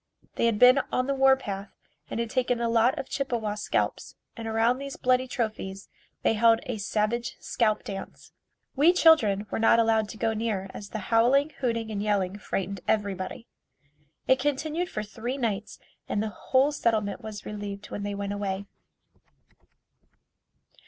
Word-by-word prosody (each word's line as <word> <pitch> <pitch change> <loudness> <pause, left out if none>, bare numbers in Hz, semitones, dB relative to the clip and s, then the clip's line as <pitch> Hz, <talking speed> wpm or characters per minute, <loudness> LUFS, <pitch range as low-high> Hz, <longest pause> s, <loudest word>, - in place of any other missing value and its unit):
They 235 - +1
had 225 -2 +1
been 250 +4 +7
on 255 - +1
the 275 - 0
war 270 0 +5
path 200 -5 -6 0.4
and - - -3
had 230 -1 -2
taken 250 -2 +1
a 235 - 0
lot 235 +5 +3
of 265 - -4
Chippewa 240 -6 -2
scalps 210 0 -2 0.2
and 225 -1 -6
around 225 +3 +2
these 275 0 -6
bloody 255 0 +2
trophies 215 -5 -4 0.3
they - - +3
held 225 +1 +4
a 240 -4 -4
savage 215 +4 -1
scalp 215 -3 0
dance. 195 -1 -8 0.4
We 305 +6 +5
children 230 - +5
were - - -1
not 225 +1 +5
allowed 225 -2 +2
to 220 - -8
go 220 +1 0
near 215 -4 -2
as 200 - -8
the 215 +1 -5
howling, 270 +6 +4
hooting 230 -3 -1
and 205 -1 -2
yelling 205 -2 0
frightened 195 -2 -3
everybody. 200 0 -1 0.8
It 260 - +4
continued 305 +5 -1
for 215 - -3
three 230 +5 -5
nights 220 -5 -2 0.3
and 210 - 0
the 220 - -2
whole 260 +7 +1
settlement 220 -7 0
was 215 -1 -8
relieved 205 -1 -6
when - - -4
they 205 0 -3
went 200 0 -3
away. 200 -1 -3
225 Hz, 165 wpm, -27 LUFS, 205-250 Hz, 0.8 s, been